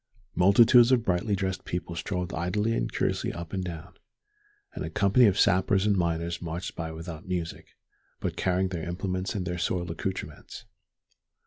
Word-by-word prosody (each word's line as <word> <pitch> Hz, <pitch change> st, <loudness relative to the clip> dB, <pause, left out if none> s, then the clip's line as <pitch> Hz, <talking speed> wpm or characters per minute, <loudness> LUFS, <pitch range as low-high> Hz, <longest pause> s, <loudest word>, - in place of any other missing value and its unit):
Multitudes 115 Hz, +7 st, +6 dB
of 120 Hz, -3 st, +3 dB
brightly 95 Hz, +3 st, +1 dB
dressed 95 Hz, -1 st, -2 dB
people 90 Hz, -1 st, -4 dB
strolled 90 Hz, +2 st, -3 dB
idly 105 Hz, +6 st, 0 dB
and -, -, -1 dB
curiously -, -, -1 dB
up 85 Hz, 0 st, -8 dB
and 95 Hz, -1 st, -1 dB
down, 90 Hz, 0 st, -7 dB, 0.8 s
and -, -, -5 dB
a -, -, -4 dB
company 105 Hz, +5 st, +4 dB
of 100 Hz, -1 st, +2 dB
sappers 95 Hz, +1 st, +3 dB
and 105 Hz, -1 st, +3 dB
miners 85 Hz, -1 st, -1 dB
marched 85 Hz, +1 st, -5 dB
by 80 Hz, -1 st, -4 dB
without 80 Hz, +3 st, -8 dB
music, 90 Hz, -3 st, -5 dB, 0.4 s
but -, -, -3 dB
carrying 95 Hz, 0 st, +1 dB
their 85 Hz, -1 st, -4 dB
implements 95 Hz, +2 st, -3 dB
and 95 Hz, -3 st, -2 dB
their 90 Hz, 0 st, -3 dB
soiled 90 Hz, 0 st, -1 dB
accoutrements. 95 Hz, +3 st, -6 dB
90 Hz, 160 wpm, -27 LUFS, 85-100 Hz, 0.8 s, Multitudes